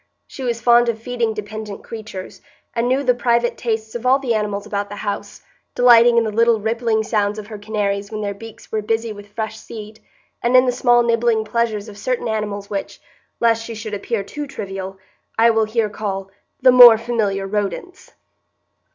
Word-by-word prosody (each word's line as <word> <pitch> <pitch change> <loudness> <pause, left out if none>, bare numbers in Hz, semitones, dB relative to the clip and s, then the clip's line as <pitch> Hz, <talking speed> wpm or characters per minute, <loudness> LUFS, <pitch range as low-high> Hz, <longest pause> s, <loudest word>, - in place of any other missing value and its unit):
She - - -11
was 240 -3 -1
fond 240 0 +4
of 225 -1 -2
feeding 230 -2 -2
dependent 210 0 -7
creatures, 215 -4 -8 0.3
and 235 0 0
knew 260 +3 +1
the 250 -2 +3
private 240 -1 +1
tastes 220 -2 -3
of 240 - -5
all 255 +1 +4
the 265 -4 -1
animals 210 -2 -2
about 205 -1 -3
the 205 - -7
house, 205 0 -5 0.3
delighting 240 -1 +6
in 230 - +5
the 220 - -2
little 230 +1 +3
rippling 225 0 0
sounds 210 -2 0
of 215 - -6
her 210 -1 -9
canaries 205 -1 -2
when 215 -1 -4
their 200 -1 -2
beaks 225 +2 -13
were 220 - -1
busy 225 +1 -1
with 205 0 -12
fresh 220 +1 -5
seed, 215 -1 -10 0.4
and 245 +2 +4
in 255 - +6
the 250 - +2
small 240 -1 +3
nibbling 230 -1 +1
pleasures 220 -2 -1
of 205 -1 -11
certain 250 +2 -2
animals 210 -2 -3
which, 200 -1 -5 0.4
lest 230 -1 +2
she 230 0 -7
should 215 0 -7
appear 205 +1 -2
too 290 +8 -6
trivial, 195 -6 -6 0.4
I 230 +1 +5
will 225 -1 +2
here 220 0 0
call 195 -2 -5 0.3
"the 255 - +8
more 245 -2 +10
familiar 215 -4 -1
rodents." 210 - -4
220 Hz, 190 wpm, -20 LUFS, 210-235 Hz, 0.4 s, more